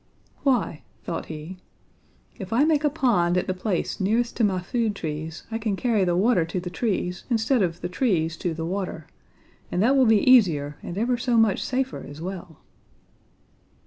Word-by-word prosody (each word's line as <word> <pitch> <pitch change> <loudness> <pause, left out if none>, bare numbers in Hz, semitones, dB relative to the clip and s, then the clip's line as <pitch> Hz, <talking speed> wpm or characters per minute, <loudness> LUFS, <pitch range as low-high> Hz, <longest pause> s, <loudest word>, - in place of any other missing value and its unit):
"'Why,' 245 - +1 0.2
thought 165 - -4
he, 160 +4 -8 0.8
'if 190 -1 -7
I 240 +5 +4
make 305 -1 +2
a 295 - +4
pond 220 - +2
at 180 - +1
the 185 - -1
place 185 0 -2
nearest 225 +5 +1
to 235 - +1
my 190 -3 +2
food 215 +3 -1
trees, 160 -1 -5
I 225 - -2
can 215 -3 -1
carry 225 -2 +1
the 175 -1 +1
water 195 -1 +3
to 165 +3 -3
the 180 0 -6
trees 180 -3 -2
instead 235 +1 +2
of 175 -2 -1
the 175 - -2
trees 175 -5 0
to 170 -3 -2
the 160 0 -4
water; 180 -3 -4 0.7
and 175 - -1
that 260 +5 +4
will 260 -3 +5
be 220 0 +4
easier 160 - +4
and 175 - -7
ever 240 +3 0
so 235 0 +1
much 225 -3 +3
safer 260 0 -2
as 145 +1 -10
well.' 175 -2 -7
195 Hz, 185 wpm, -25 LUFS, 175-235 Hz, 0.8 s, will